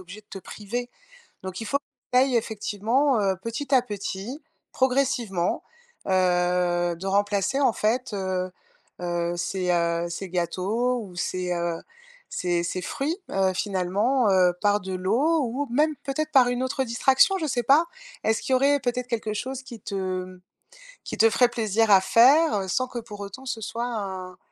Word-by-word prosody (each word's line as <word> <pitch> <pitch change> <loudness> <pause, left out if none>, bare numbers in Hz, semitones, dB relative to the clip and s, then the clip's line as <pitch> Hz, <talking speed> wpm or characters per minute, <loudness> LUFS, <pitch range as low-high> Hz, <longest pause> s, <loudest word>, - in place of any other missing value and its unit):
obligé 185 +4 -11
de - - -48
te - - -7
priver. 235 +6 -6 0.5
Donc, 190 +3 -6
il - - -4
faut 280 - +1
que - - -54 0.3
tu 250 - +5
ailles 260 -1 +2
effectivement, 225 +4 +1
heu, 195 -2 +1
petit 245 +5 -4
à 255 - +6
petit, 205 +3 -5 0.3
progressivement, 250 -8 0 0.4
heu, 190 - 0 0.8
de 185 +4 -6
remplacer, 205 +5 +1
en 255 -5 +3
fait, 235 +2 0
heu 185 -2 -2 0.5
heu, 175 0 -1
ces, 180 +1 -1
heu, 170 0 +1
ces 190 +2 -5
gâteaux 200 +8 -1
ou 185 -5 -10
ces, 180 0 -2
heu, 170 -1 -2 0.5
ces 175 -1 0
ces 180 +1 -3
fruits, 300 +5 -2 0.2
heu, 190 -1 +2
finalement, 205 +6 +1
heu, 180 -2 +4
par 205 0 +3
de 190 0 -5
l'eau 235 - +2
ou 260 +4 -2
même 300 +4 +2
peut-être 310 +3 -2
par 255 -3 +6
une 245 +1 -1
autre 260 +1 -1
distraction, 265 +9 +3
je 320 - -1
sais 245 -3 -1
pas. 285 +8 +5 0.4
Est-ce 220 0 +1
qu'il 260 - 0
y - - +6
aurait 280 +2 +3
peut-être 250 0 -2
quelque 220 -3 -2
chose 260 +4 -4
qui 240 -4 -10
te 185 -1 -4 0.7
qui - - -5
te 225 - +6
ferait 245 +2 +4
plaisir 220 -2 +1
à 190 - +8
faire 240 - +4
sans 255 +6 0
que 245 - -5
pour 215 -3 -10
autant 200 +7 -8
ce 230 -3 -4
soit 230 +3 -3
un 190 -6 -5
220 Hz, 175 wpm, -25 LUFS, 190-255 Hz, 0.8 s, à